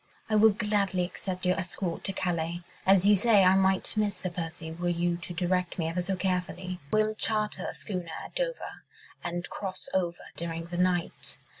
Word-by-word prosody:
I - - +4
will 215 +1 +8
gladly 200 -3 +1
accept 185 0 -4
your 180 0 +3
escort 180 -1 -3
to 195 - 0
Calais... 175 -2 -1 0.2
as 195 -1 +6
you 205 0 +7
say, 205 0 +5
I 185 0 +7
might 190 0 +3
miss 210 -2 +1
Sir 185 - -3
Percy 165 -1 -5
were 175 +2 -2
you 175 0 +1
to 175 +1 -8
direct 180 +1 0
me 165 -3 0
ever 175 +2 -1
so 190 +2 -1
carefully. 185 -1 -2
We'll 215 0 +3
charter 215 -1 0
a - - -6
schooner 180 -4 -4 0.2
at - - -11
Dover - - -3 0.4
and 175 +1 -3
cross 190 -2 -5
over 175 -2 0
during 165 0 -4
the 175 +1 -5
night. 180 -1 0
185 Hz, 185 wpm, -29 LUFS, 175-195 Hz, 0.4 s, will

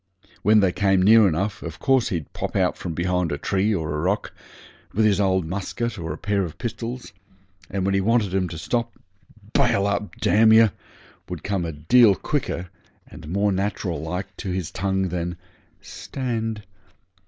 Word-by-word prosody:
When 105 +1 +5
they 95 -2 +3
came 95 0 +2
near 110 +1 +7
enough 95 +5 -1
of 85 0 -7
course 130 -3 +2
he'd 80 -6 -4
pop - - -4
out - - +2
from 85 -3 -5
behind 90 -1 0
a 70 - -1
tree 95 +7 0
in 105 - +1
a 80 - -4
rock, 80 +7 -1 0.6
with 110 +1 +3
his 100 -2 +3
old 95 -3 +2
musket 100 +6 -3
or 80 -1 -4
a 75 - -5
pair 100 +2 0
of 85 -5 -5
pistols, 120 -3 -5 0.6
and 95 -1 -2
when 100 - +1
he 95 - +2
wanted 105 -2 +1
'em 95 -2 0
to 80 - -7
stop 115 +8 -2 0.6
'Bail 100 - +3
up, 100 0 -2
d - - +1
yer,' 110 +1 +6 0.6
would - - -6
come 95 -3 -1
a 85 - -3
deal 100 +8 +5
quicker 85 +1 -3 0.3
and - - -12
more 100 +3 +1
natural 95 -4 -2
like 90 +4 -5
to 95 - -5
his 90 -2 -3
tongue 95 0 -1
than 90 0 -3 0.4
'Stand.' 115 -5 -4
95 Hz, 175 wpm, -23 LUFS, 90-105 Hz, 0.6 s, near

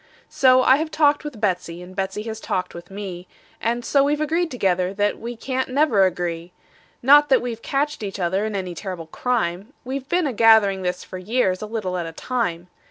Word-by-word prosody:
So 255 -1 +5
I 260 - +6
have 315 +1 -2
talked 295 -2 +2
with 295 -7 -7
Betsey, 180 -4 -1
and 185 +1 -12
Betsey 195 +2 -3
has 220 -1 -6
talked 185 -4 -3
with 170 +1 -10
me, 190 -3 -7 0.3
And 235 +1 -1
so 280 -1 +3
we've 290 +1 +1
agreed 325 +3 0
together 190 - 0
that 205 0 0
we 240 +1 -6
can't 260 +3 -3
never 255 -8 +3
agree; 175 -1 -4 0.5
Not 290 +3 +7
that 265 - +5
we've 235 -2 -5
catched 290 +2 -1
each 200 -1 -5
other 190 +3 0
in 215 -1 -3
any 185 -2 -3
terrible 180 -2 -6
crime; 200 - -2
We've 265 +2 -5
been 355 -1 +2
a 270 - -1
gathering 220 -4 +5
this 180 0 -2
for 185 - -8
years, 190 -2 0
a 215 - -4
little 200 -5 -3
at 170 - -3
a 165 - -8
time. 180 -6 -2
215 Hz, 205 wpm, -22 LUFS, 185-260 Hz, 0.5 s, Not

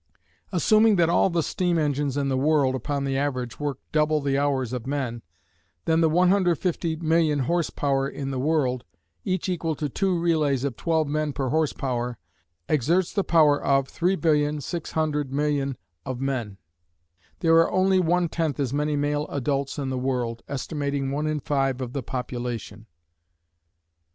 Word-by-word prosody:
Assuming 215 +4 +4
that 170 -2 +3
all 185 - +4
the 170 -2 0
steam 175 +1 0
engines 145 -2 0
in 140 -1 0
the 135 - 0
world 140 -1 +2
upon 140 +2 -2
the 135 -1 -1
average 130 -4 -2
work 145 -3 -2
double 155 0 +2
the 140 -1 0
hours 135 -3 0
of 125 0 -4
men, 130 -5 -2 0.6
then 160 0 +3
the 160 - +4
150,000,000 170 -3 +2
horse 170 +5 0
power 135 -1 0
in 135 -1 -5
the 130 - -2
world, 130 -4 +1 0.4
each 185 0 -1
equal 165 -3 -1
to 150 0 -2
two 190 +5 0
relays 155 -6 +1
of 140 -4 -2
twelve 160 +1 0
men 150 0 -1
per 135 -2 -2
horse 155 +1 +1
power, 125 -2 -3 0.5
exerts 160 +6 +1
the 200 - +1
power 150 -5 +4
of 135 -1 +2
3,600,000,000 150 -4 0 0.3
of 130 -2 -5
men. 125 -7 -3 0.8
There 165 -1 +5
are 165 - +4
only 190 0 +3
one 175 0 +2
tenth 160 -3 -2
as 135 -2 -1
many 150 +1 0
male 145 +1 0
adults 140 0 -2
in 135 -2 -2
the 130 - -2
world, 125 -3 -2
estimating 140 -1 -2
one 150 +2 -1
in 155 -1 -1
five 135 -2 0
of 125 -2 -5
the 140 - -2
population. 120 -3 -5
145 Hz, 155 wpm, -25 LUFS, 135-160 Hz, 0.8 s, There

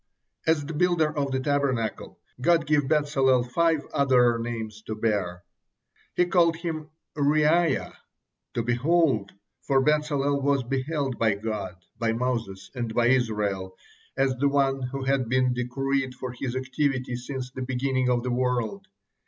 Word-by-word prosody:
As 160 -3 +2
the 165 - -5
builder 160 -1 +2
of 140 -2 0
the 130 0 -1
Tabernacle, 130 -5 -1 0.2
God 165 +2 +3
gave 145 -2 +2
Bezalel 135 -4 +3
five 160 +4 +1
other 125 -4 +4
names 110 -2 -5
to 110 - -3
bear. 100 -5 -1 0.7
He 180 - +4
called 170 -2 +3
him 160 -2 -5 0.3
Reaiah, 155 +1 +2 0.6
"to 115 - 0
behold," 120 -3 +2 0.3
for 135 -1 +2
Bezalel 145 -1 +1
was 140 -1 +2
beheld 135 +1 -2
by 110 -3 +3
God, 105 -3 -4 0.2
by 115 -1 +1
Moses, 115 -6 -3
and 120 -3 -4
by 120 0 +3
Israel, 105 -7 0 0.4
as 135 0 +2
the 140 +2 +2
one 135 -1 +1
who 135 0 -4
had 135 -3 0
been 130 0 +2
decreed 130 +2 -1
for 130 0 -5
his 125 0 -4
activity 130 -1 -1
since 125 +1 -5
the 130 - -7
beginning 130 0 0
of 120 -1 +1
the 125 - -2
world. 125 - -1
130 Hz, 145 wpm, -26 LUFS, 120-145 Hz, 0.7 s, other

